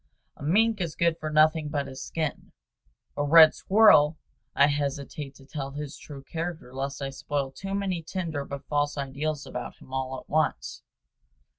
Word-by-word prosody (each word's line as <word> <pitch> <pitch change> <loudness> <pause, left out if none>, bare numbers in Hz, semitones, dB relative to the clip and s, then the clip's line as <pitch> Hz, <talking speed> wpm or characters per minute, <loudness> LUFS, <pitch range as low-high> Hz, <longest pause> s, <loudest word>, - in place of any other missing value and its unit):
A - - -18
mink 210 +8 +2
is 170 -3 -3
good 170 -1 +1
for 155 - -3
nothing 155 0 +3
but 145 -2 -1
his 130 0 -8
skin; 160 -3 -4 0.6
a 145 - 0
red 155 +2 +8
squirrel 175 -7 +5 0.4
I 140 - +6
hesitate 140 0 -3
to 135 - -16
tell 135 0 -6
his 145 0 -6
true 140 -2 -10
character 165 -4 -5
lest 140 +1 -4
I 135 - -3
spoil 135 +1 -3
too 195 +7 -5
many 190 -4 -1
tender 160 -3 -4
but 140 0 -8
false 145 0 0
ideals 140 +2 -3
about - - -6
him 130 - -16
all 130 0 -3
at - - -17
once. 155 +1 -1
145 Hz, 170 wpm, -27 LUFS, 140-160 Hz, 0.6 s, red